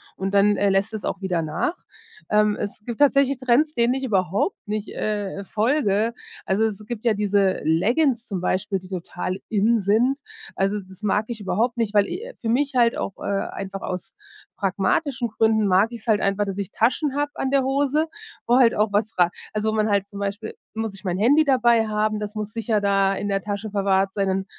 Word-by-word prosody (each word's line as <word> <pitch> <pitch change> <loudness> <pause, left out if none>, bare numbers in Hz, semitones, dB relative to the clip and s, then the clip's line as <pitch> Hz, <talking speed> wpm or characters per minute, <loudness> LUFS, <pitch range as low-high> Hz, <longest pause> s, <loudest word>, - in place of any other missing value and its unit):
Und 190 +1 -3
dann, 205 +1 +4
äh, 200 - +2
lässt 195 +3 +1
es 215 - -5
auch - - -3
wieder 180 -3 0
nach. 155 - -1 0.6
Ähm, 210 0 +3
es 205 - -5
gibt 235 -2 -5
tatsächlich 275 -1 +4
Trends, 260 +4 +2
denen 240 0 +2
ich 270 - -3
überhaupt 200 - 0
nicht, 210 0 -3
äh, 205 -2 -3
folge. 220 0 +1 0.3
Also, 210 +2 +2
es 215 -3 -2
gibt 225 -1 -6
ja 230 -3 +2
diese 200 -2 +1
Leggins 235 - +2
zum 195 -3 -3
Beispiel, 190 +2 -1
die 185 0 -11
total 185 0 -4
in 220 +2 +2
sind. 225 +8 +2 0.4
Also, 195 +2 0
das 190 0 -14
mag 210 0 +1
ich 230 -3 -5
überhaupt 225 +5 0
nicht, 220 -3 -1
weil 205 -1 +5
i 480 +5 -6
für 230 - -6
mich 270 +3 +1
halt 235 -2 +4
auch, 195 - -3
äh, - - -17
einfach 195 -1 -3
aus 180 -1 -5 0.4
pragmatischen 230 - 0
Gründen 220 0 +2
mag 195 +2 +4
ich's 235 -2 -9
halt 215 -4 +2
einfach, 200 +1 +1
dass 195 0 -4
ich 200 - -3
Taschen 260 +5 +1
habe 290 0 -1
an 265 - -2
der 275 0 +2
Hose, 280 +3 +1 0.4
wo 240 +1 +4
halt 245 -3 +5
auch 210 0 +1
was 210 +1 0
rei 175 -1 +4 0.2
also 215 +1 -1
wo - - -2
man 215 0 +1
halt 200 -1 +1
zum 200 0 -9
Beispiel, 205 +2 -4 0.2
muss 220 -2 -3
ich 195 - -12
mein 180 -2 -1
Handy 270 +10 +4
dabei 240 -5 +3
haben, 215 0 0
das 210 +1 -5
muss 215 0 -4
sicher 225 -2 0
da 195 -1 +2
in 205 +1 -3
der 195 0 0
Tasche 205 +1 -4
verwahrt 195 -1 +1
sein, 200 -1 0
dann 190 0 -1
210 Hz, 210 wpm, -23 LUFS, 195-235 Hz, 0.6 s, weil